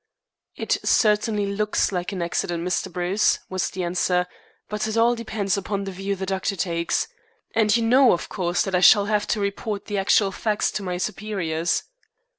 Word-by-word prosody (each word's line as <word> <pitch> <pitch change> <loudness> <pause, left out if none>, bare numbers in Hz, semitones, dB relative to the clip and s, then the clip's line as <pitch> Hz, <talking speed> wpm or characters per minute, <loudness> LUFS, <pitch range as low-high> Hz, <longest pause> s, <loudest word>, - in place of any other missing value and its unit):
"It - - -1
certainly 210 -1 +2
looks 205 +1 0
like 180 0 -3
an 185 -3 -3
accident, 170 0 -2
Mr. 180 - -1
Bruce," 180 +4 +1
was 185 -4 -1
the 185 - -4
answer, 180 +1 +1 0.4
"but 210 0 -2
it 220 +1 -2
all 235 +1 +4
depends 215 -4 -2
upon 200 0 -3
the 195 - -5
view 195 +2 -3
the 190 0 -4
doctor 190 +1 -2
takes. 170 -2 -1 0.5
And 220 0 +3
you 230 - 0
know, 250 +2 +5
of 170 - -1
course, 175 -1 -1
that 195 -3 -4
I 180 - +3
shall 200 +2 +7
have 210 0 0
to 215 - 0
report 200 +1 -3
the 205 -2 -2
actual 195 +1 +3
facts 210 +1 -1
to 210 - -3
my 180 -2 -3
superiors." 180 -5 -2
200 Hz, 185 wpm, -23 LUFS, 180-210 Hz, 0.5 s, shall